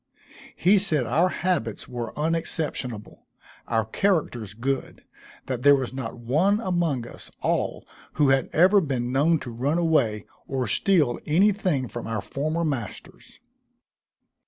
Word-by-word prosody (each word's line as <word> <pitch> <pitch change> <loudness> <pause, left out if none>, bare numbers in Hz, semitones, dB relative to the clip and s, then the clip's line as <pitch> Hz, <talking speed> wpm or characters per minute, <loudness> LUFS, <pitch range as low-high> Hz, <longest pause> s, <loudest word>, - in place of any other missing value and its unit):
He 195 +3 +4
said 155 -10 +4
our 160 +11 +2
habits 170 - -2
were 120 -2 -5
unexceptionable, 150 -7 -3 0.4
our 115 -2 0
characters 120 - -1
good; 135 +4 -3 0.4
that 130 -2 -3
there 145 +2 +7
was 130 -2 -3
not 130 -3 -5
one 155 - +1
among 175 - -1
us - - -11
all - - -1 0.3
who 145 -3 +3
had 135 -1 +2
ever 190 +5 +5
been 125 -6 -2
known 150 +5 +3
to 125 - -6
run 135 +8 -1
away, 140 - +1 0.2
or 130 -2 -2
steal 145 - +2
any 185 +8 +4
thing 180 -11 -1
from 120 -2 -7
our 115 -3 -3
former 155 - -2
masters. 125 - -6
140 Hz, 135 wpm, -25 LUFS, 120-170 Hz, 0.4 s, there